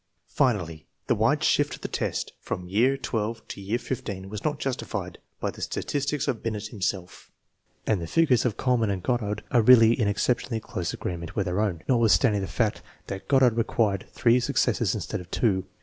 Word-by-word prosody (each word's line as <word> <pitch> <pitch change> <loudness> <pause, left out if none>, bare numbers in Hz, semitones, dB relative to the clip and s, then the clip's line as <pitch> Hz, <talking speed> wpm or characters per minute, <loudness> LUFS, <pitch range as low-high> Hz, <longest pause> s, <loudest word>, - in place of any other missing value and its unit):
Finally., 85 - 0 0.2
the - - +2
wide - - +2
shift - - +2
of - - -17
the - - -3
test - - -3
from 90 0 -5
year 115 +9 +3
XII 115 -4 -2
to - - -8
year 100 +4 -1
XV 125 +1 -4 0.3
was 105 0 -6
not 150 -1 0
justified 135 -3 -4 0.2
by - - -2
the - - -12
statistics 145 0 -2
of 115 - -1
Binet 105 -2 -3
himself, 95 -4 -4 0.6
and 105 -5 +1
the 85 - -4
figures 135 - +3
of 120 -5 -1
Kuhl 125 -1 +2
mann 110 -3 +1
and 95 -3 -2
Goddard 105 -3 -1
are 120 - +5
really 115 -1 +7
in 115 -3 0
exceptionally 115 +3 0
close 90 -5 -4
agree 90 - -4
ment 85 -1 -8
with 100 -2 0
our 90 +2 -1
own, 95 -7 -1
notwithstanding 115 -3 +3
the 95 - -3
fact 110 -4 -1 0.2
that 95 - -7
Goddard 130 -4 +5
required 110 -4 0
three 120 +1 +3
successes 120 - +1
instead - - -4
of 90 - -13
two. 95 -5 0
110 Hz, 195 wpm, -26 LUFS, 95-125 Hz, 0.6 s, really